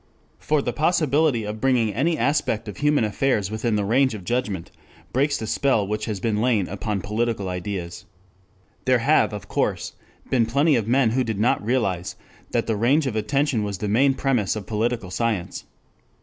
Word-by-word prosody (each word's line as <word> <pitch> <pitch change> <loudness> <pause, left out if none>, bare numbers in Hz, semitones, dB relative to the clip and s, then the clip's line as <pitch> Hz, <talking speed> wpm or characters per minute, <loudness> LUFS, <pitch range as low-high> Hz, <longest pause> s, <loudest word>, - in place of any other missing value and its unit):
For 150 -2 0
the 120 - -2
possibility 155 -6 +2
of 105 +1 -5
bringing 120 -5 +2
any 155 - +1
aspect 115 -6 0
of 105 - -7
human 150 -3 +2
affairs 105 -1 0
within 110 +1 -1
the 105 -1 0
range 130 +3 +2
of 100 - -8
judgment 105 -5 -2 0.4
breaks 140 +3 +2
the 110 - -5
spell 110 -2 +1
which 105 +2 -3
has 105 -4 -4
lain 110 -2 +1
upon 100 +1 -3
political 105 -1 -1
ideas. 90 0 -5 0.8
There - - +4
have, - - +3
of - - -7
course, - - -1 0.3
been 120 -4 +2
plenty 140 +5 +3
of 110 -3 -1
men 125 -1 +3
who 130 +2 +1
did 110 -4 -3
not 110 -1 +2
realize 100 -7 -1 0.3
that 115 - 0
the 110 - 0
range 135 +8 +2
of 125 -5 -2
attention 135 +3 0
was 100 -2 -3
the 105 - -3
main 130 +6 +3
premise 125 -9 0
of 105 -3 -5
political 110 -2 -2
science. 110 -5 -2
115 Hz, 175 wpm, -23 LUFS, 105-135 Hz, 0.8 s, There